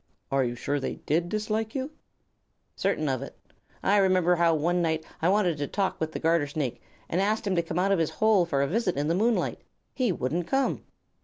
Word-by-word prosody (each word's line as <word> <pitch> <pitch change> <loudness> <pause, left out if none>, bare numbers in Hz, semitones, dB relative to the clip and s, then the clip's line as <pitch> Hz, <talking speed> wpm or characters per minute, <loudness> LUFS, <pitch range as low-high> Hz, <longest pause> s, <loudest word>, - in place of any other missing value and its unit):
"Are 135 -1 +3
you 120 -1 -2
sure 145 +4 -2
they 135 - -3
did 170 +3 -1
dislike 215 +2 -2
you?" 270 +2 -3 0.8
"Certain - - 0
of - - -1
it. - - -8 0.5
I 205 - +4
remember 185 -3 +4
how 165 -1 +4
one 175 +4 +1
night 160 -1 0 0.2
I 165 - +3
wanted 185 -6 +2
to 145 - -1
talk 190 -1 -1
with 160 0 -2
the - - -4
Garter 165 -2 +2
Snake, 140 -4 -3 0.3
and 180 - 0
asked 215 +3 0
him 195 -2 0
to 170 - +3
come 165 0 -5
out 190 +2 +2
of 195 - +3
his 160 - +1
hole 215 -5 +3
for 140 -4 +1
a - - 0
visit 190 - 0
in 145 +2 0
the - - +3
moonlight. 225 +6 +1 0.3
He 250 -6 +1
wouldn't 165 +2 -2
come." 270 0 0
175 Hz, 220 wpm, -27 LUFS, 160-205 Hz, 0.8 s, I